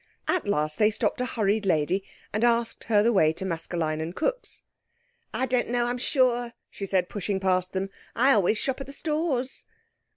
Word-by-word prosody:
At 355 - +1
last 155 -6 0
they 210 -1 +5
stopped 220 - 0
a 250 - 0
hurried 215 -2 0
lady, 175 +3 +1 0.3
and 215 +2 0
asked 235 -1 +1
her 210 -2 +4
the 235 +2 +3
way 155 -6 +5
to 190 - -5
Maskelyne 165 -2 -2
and 165 +3 -5
Cooke's. - - -2 0.7
"I 260 - 0
don't 250 -1 +1
know, 240 0 +1
I'm 245 +1 -2
sure," 245 -2 +2 0.2
she 195 - -5
said, 185 -2 +1
pushing 200 0 -2
past 185 -1 +1
them. 195 +1 -2 0.2
"I 260 +4 +4
always 210 -2 +3
shop 265 +4 -1
at 270 - -6
the 275 - -8
Stores." 300 -5 -1
215 Hz, 190 wpm, -26 LUFS, 185-250 Hz, 0.7 s, they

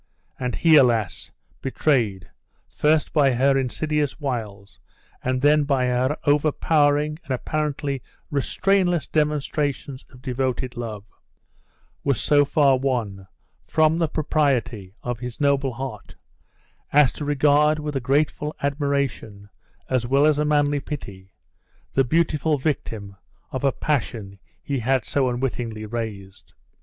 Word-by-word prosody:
And 125 -1 -2
he, 160 -2 +5
alas! 115 - +2 0.3
betrayed, 115 -9 0 0.4
first 150 +1 +1
by 140 -4 +4
her 135 +3 +3
insidious 145 +2 -1
wiles, 105 - -5 0.4
and 130 +1 -1
then 150 +1 +5
by 135 -3 +1
her 125 +4 0
overpowering 150 0 +2
and - - -25
apparently 145 0 -2 0.3
restrainless 175 +4 +1
demonstrations 145 -2 -1
of 125 -1 -17
devoted 130 -1 -2
love, 110 -4 -5 1.0
was 140 -5 +1
so 145 -1 +4
far 140 -2 +3
won 110 -8 -2 0.4
"from 155 +1 +3
the 165 - +2
propriety" 130 - -1
of 120 -1 -3
his 125 -1 -7
noble 140 -2 +1
heart, 130 +2 -7 0.8
as 145 -2 +5
to - - -6
regard 145 +1 +3
with 150 -1 -4
a - - +1
grateful 150 +3 0
admiration, 140 -8 -2 0.4
as 125 -2 0
well 140 +3 +4
as 150 -1 +3
a 150 - +1
manly 145 -1 +2
pity, 100 -11 -8 0.6
the 135 - +3
beautiful 155 +1 +1
victim 110 -8 -3 0.3
of 130 - -4
a 135 - +3
passion 115 -11 -3 0.2
he 140 -2 -2
had 130 0 +1
so 135 -3 +1
unwittingly 120 -3 -3
raised. 100 - -7
135 Hz, 125 wpm, -23 LUFS, 120-150 Hz, 1.0 s, he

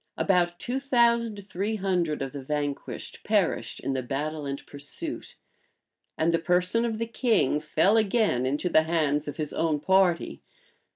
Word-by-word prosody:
About 175 -2 +2
two 250 +8 -3
thousand 235 -6 +1
three 205 +4 -2
hundred 180 -7 0
of 135 - -5
the 140 - -7
vanquished 145 +1 -4
perished - - 0
in 135 - -2
the 130 - -1
battle 145 +4 -3
and 140 0 -5
pursuit; 145 - -4 0.8
and 160 +1 +2
the 165 - +2
person 180 +7 +1
of 225 -2 -2
the 230 - -1
king 225 - +1
fell 160 +7 +2
again 205 - +2
into 145 +6 -1
the 160 -2 +5
hands 155 -3 0
of 145 - -5
his 155 -2 -3
own 160 -2 0
party. 180 - +2
170 Hz, 160 wpm, -27 LUFS, 150-215 Hz, 0.8 s, the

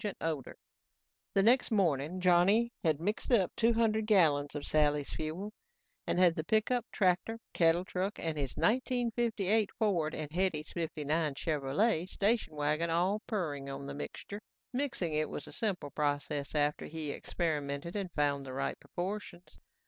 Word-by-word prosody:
The 165 - -3 0.9
next 245 +4 +5
morning, 175 - +1
Johnny 190 +7 +4
had 155 -4 +2
mixed 210 +9 -2
up 200 -7 +4
two 230 +1 +3
hundred 220 -1 +1
gallons 150 -9 +3
of 145 - -4
Sally's 150 -2 +2
Fuel 170 +7 -4 0.5
and - - 0
had 180 -2 +5
the 160 - -3
pickup, 220 +5 +1
tractor, 185 +4 +1 0.2
cattle 170 +1 +3
truck 190 +2 -3
and 160 -1 -2
his 140 -4 -3
1958 230 -4 +1
Ford 180 -8 +1
and 150 -1 -5
Hetty's 175 -3 0
'59 155 -2 -1
Chevrolet 160 - 0
station 205 -5 +1
wagon 150 +3 +1
all 180 +6 +1
purring 150 - -3
on 135 0 -6
the 140 - -5
mixture. 200 +7 -7 0.3
Mixing 245 - -1
it 155 0 0
was 145 - -6
a - - -10
simple 195 - -2
process 145 0 -2
after 150 0 +1
he 155 -2 -3
experimented 150 0 -3
and 195 -3 -3
found 145 -2 +1
the 130 -1 -7
right 135 - -2
proportions. 180 -1 -6
170 Hz, 150 wpm, -32 LUFS, 150-210 Hz, 0.9 s, next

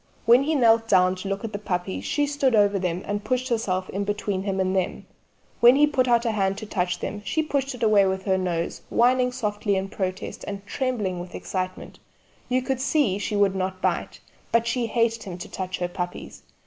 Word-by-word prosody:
When 240 +3 +7
he 310 +3 0
knelt 225 -3 +4
down 185 0 +5
to 185 - -6
look 195 +2 -3
at 225 -1 -5
the 205 - -3
puppies 175 - -3
she 290 - +1
stood 280 -4 +1
over 205 -1 +3
them 180 0 -2
and 205 0 -3
pushed 255 +4 -1
herself 190 -6 -1
in 200 +2 -2
between 205 -1 -2
him 195 -1 -2
and 190 0 +1
them; 185 -2 -1 0.5
when 240 +2 +7
he 295 +2 +6
put 265 -4 +1
out 235 0 +3
a 230 - +2
hand 195 -2 0
to - - -6
touch 180 -3 -1
them 205 - -4
she 315 +10 0
pushed 275 -3 -1
it 235 - -6
away 210 -3 +5
with 190 0 -2
her 190 -2 +2
nose, 175 -3 -2
whining 250 +1 +3
softly 210 -4 -1
in 190 0 -2
protest 185 -2 -4
and 200 0 -6
trembling 215 -9 -2
with 175 +1 -8
excitement 185 -1 -5 0.5
you 255 0 +1
could 265 -1 -2
see 270 -8 +1
she 210 - -2
would 200 -2 +3
not 185 0 -2
bite, - - -1 0.3
but 230 0 +3
she 235 0 0
hated 230 0 +1
him 180 -3 -7
to 180 - -7
touch 185 -1 -4
her 175 - -1
puppies. 180 0 -6
205 Hz, 215 wpm, -25 LUFS, 185-240 Hz, 0.5 s, When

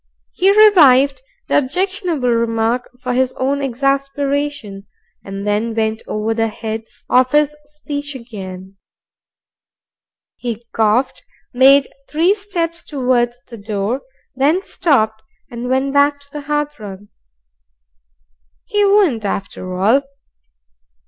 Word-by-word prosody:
He 375 +1 +2 0.2
revived 280 - +5 0.3
the - - +4
objectionable 340 -2 -1
remark 230 +1 0
for 250 0 -3
his 255 0 +1
own 275 +2 -1
exasperation, 275 -4 -2 0.4
and 195 +1 -6
then 215 +2 -1
went 220 0 -1
over 215 +1 -1
the 225 0 0
heads 220 0 -7
of 255 0 +3
his 300 0 +3
speech 290 -1 -6
again. 195 -6 -9 1.6
He 235 -1 -5
coughed, 220 +4 +1 0.3
made 270 +2 +6 0.2
three 330 +6 +3
steps 345 -5 -4
towards 250 -4 0
the 230 -2 -10
door, 210 +4 -2 0.3
then 300 +8 +2
stopped 220 - +1 0.3
and 240 +1 -5
went 265 +1 0
back 285 0 +3
to 285 - -19
the 295 - -6
hearthrug. 295 -10 -3 1.6
He 415 0 +1
wouldn't 395 - +3
after 185 -2 -4
all. 225 +9 +4
255 Hz, 110 wpm, -18 LUFS, 225-290 Hz, 1.6 s, made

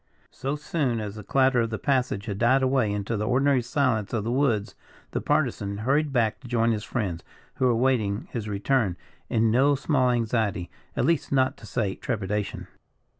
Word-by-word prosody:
So 135 +3 -3
soon 145 -5 -1
as 105 -2 -4
the 105 0 -9
clatter 130 +2 +3
of 115 - -1
their 110 - -3
passage 125 -7 0
had 100 -2 -4
died 130 +3 +4
away 130 -5 +2
into 105 +2 -2
the 105 +1 -2
ordinary 135 +1 +3
silence 120 -5 0
of 110 -3 0
the 115 - -2
woods, 120 -6 +1 0.4
the - - -2
Partisan 100 0 0
hurried 140 +7 +1
back 115 -4 +1
to 130 - -12
join 115 -1 +2
his 105 -2 -2
friends, 95 -10 -3 0.3
who 130 - +1
were 125 - +4
awaiting 115 -3 +1
his 110 -3 -4
return 105 -1 0 0.3
in 110 -1 +2
no 135 +5 +4
small 135 -2 +1
anxiety, 110 -7 0 0.3
at - - +2
least, 165 -2 +1
not 130 -1 +2
to 110 - -12
say 105 -5 -1
trepidation. 105 -3 -3
120 Hz, 185 wpm, -26 LUFS, 105-130 Hz, 0.4 s, died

